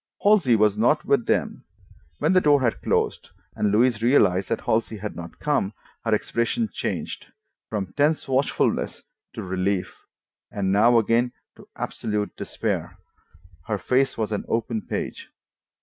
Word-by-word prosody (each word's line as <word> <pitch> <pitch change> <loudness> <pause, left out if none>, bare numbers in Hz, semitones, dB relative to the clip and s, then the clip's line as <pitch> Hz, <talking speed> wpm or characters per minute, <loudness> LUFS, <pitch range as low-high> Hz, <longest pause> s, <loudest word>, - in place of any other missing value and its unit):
Halsey 200 - +5
was 105 -1 +3
not 150 +7 +3
with 140 -4 +2
them. - - 0 0.5
When 160 +5 +2
the 185 - +5
door 145 -3 +5
had 120 -3 0
closed - - 0 0.3
and 105 - +1
Louise 115 +1 +3
realized 100 -7 +3
that 115 - -1
Halsey 110 0 0
had 105 +1 -6
not 85 -1 -9
come, 140 -9 0 0.3
her 115 -2 +2
expression 115 - -1
changed. - - -4 0.4
From 95 -4 -3
tense 150 +2 +2
watchfulness 135 +1 0 0.3
to - - -5
relief, 95 0 -1 0.5
and 95 -2 -1
now 115 +4 +5
again 115 +2 +2 0.2
to - - -16
absolute 105 -1 -3
despair, - - -3 0.7
her 105 -2 0
face 130 +6 +1
was 110 -1 -2
an 105 - -2
open 115 -1 -1
page. - - -4
115 Hz, 145 wpm, -24 LUFS, 105-130 Hz, 0.7 s, Halsey